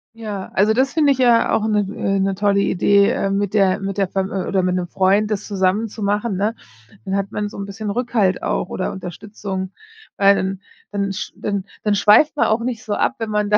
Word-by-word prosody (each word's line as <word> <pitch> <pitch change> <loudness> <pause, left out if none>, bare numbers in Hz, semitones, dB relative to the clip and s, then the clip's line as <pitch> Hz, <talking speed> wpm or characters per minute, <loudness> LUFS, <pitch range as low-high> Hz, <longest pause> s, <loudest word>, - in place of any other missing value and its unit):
Ja, 210 -4 -6
also, 210 +3 +4
das 265 +3 +2
finde 295 -3 +4
ich 265 - -9
ja 240 -2 +4
auch 215 - +1
'ne, 210 -1 +2 0.2
äh 195 0 0
'ne, 195 0 0
tolle 200 0 +2
Idee, 200 +1 +3
äh, 250 -7 -1
mit 200 0 -1
der 195 -3 +3
mit 195 0 -4
der 195 -2 +1
F - - -39
oder 190 0 0
mit 180 0 0
'nem 180 -1 -2
Freund 195 +4 +2
das 205 -1 -2
zusammen 200 +2 +1
zu 215 0 -8
machen, 205 +1 0
ne? 205 +4 0 0.5
Dann 190 - -2
hat 200 +1 -2
man 210 -1 -2
so - - -10
'n 200 - -4
bisschen 205 +2 -6
Rückhalt 220 -4 0
auch - - -1
oder 185 - -3
Unterstützung, 190 +1 -6 0.5
weil 200 0 +5
dann 190 0 -2 0.3
dann 200 -1 -2
sch - - -5
dann 200 -2 -2 0.2
dann 210 -1 +2
schweift 210 +10 +5
man - - +2
auch 220 +2 +2
nicht 235 -2 -4
so 210 - -3
ab, 255 - +1
wenn 225 -1 -3
man 210 -1 0
da 210 - +5
200 Hz, 230 wpm, -20 LUFS, 195-215 Hz, 0.5 s, weil